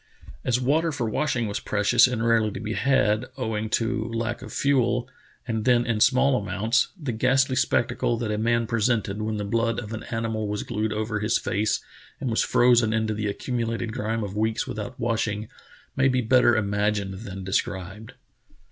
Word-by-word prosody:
As 125 -1 +1
water 155 +6 +1
for 135 -6 -2
washing 120 +1 0
was 100 -1 -3
precious 105 +4 +3
and 120 -2 -2
rarely 115 -2 +3
to - - -5
be 110 +1 -4
had, 130 -3 +2
owing 110 -1 -2
to 115 0 0
lack 115 +1 -3
of - - -9
fuel, 125 -3 +1 0.4
and 110 -2 -1
then 120 0 +3
in 115 -2 0
small 130 +1 +4
amounts, 105 +6 +1
the 145 -6 -3
ghastly 130 +3 +2
spectacle 120 -1 +1
that 115 -2 -2
a 105 - -1
man 115 +1 +1
presented 110 -2 0
when 110 0 -2
the 105 - -3
blood 115 +2 0
of 110 -2 -7
an 110 - -5
animal 115 -2 -2
was 105 0 -3
glued 110 -1 -2
over 110 0 -2
his 105 +2 +1
face, 105 +2 -1 0.4
and 125 - -2
was 110 - +2
frozen 120 -3 +4
into 110 -1 0
the 105 0 -2
accumulated 115 +1 -3
grime 110 +1 -2
of 100 -1 -5
weeks 110 +1 0
without 120 +4 -6
washing, 110 -3 -1 0.5
may 135 - +3
be 130 -1 +2
better 120 0 +4
imagined 100 -2 -1
than 95 -3 -7
de 95 +1 -5
scribed. 95 +3 -3
115 Hz, 185 wpm, -25 LUFS, 105-120 Hz, 0.5 s, small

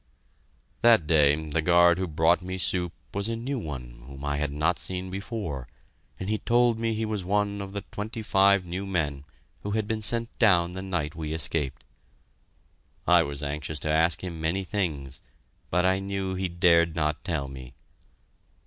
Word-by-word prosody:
That 115 -8 +6
day 75 -2 +5 0.2
the 80 - +1
guard 85 +1 +5
who 95 - -1
brought 80 +3 +3
me 95 +1 -5
soup 90 -2 +2 0.2
was 100 +2 -1
a 115 - -1
new 130 +4 -3
one 60 - -7
whom 70 +1 -8
I 70 0 -1
had 75 -1 -1
not 80 +4 +1
seen 95 0 -4
before, 95 - -5 0.5
and 95 - -4
he 110 +1 0
told 120 -1 +2
me 115 -1 0
he 110 +1 -1
was 105 -3 -3
one 100 +2 0
of 100 0 -7
the 100 - -3
twenty 110 +2 -5
five 100 -2 +4
new 90 +3 -4
men 75 -7 -2 0.4
who 100 - -5
had 110 - 0
been 110 0 -2
sent 115 +2 +1
down 90 -7 +4
the 95 +1 -6
night 90 -6 -2
we 80 -1 -4
escaped. 80 -3 -3 1.2
I - - +6
was 70 0 -4
anxious 75 +1 -4
to 75 - 0
ask 80 +3 +3
him 85 -3 -5
many 85 +5 0
things, 75 -9 -3 0.5
but 90 +2 +2
I 95 +1 +3
knew 95 -1 -3
he 95 0 -2
dared 85 -1 +3
not 75 -2 -1
tell 80 -7 -2
me. 65 -2 -10
90 Hz, 180 wpm, -27 LUFS, 75-100 Hz, 1.2 s, That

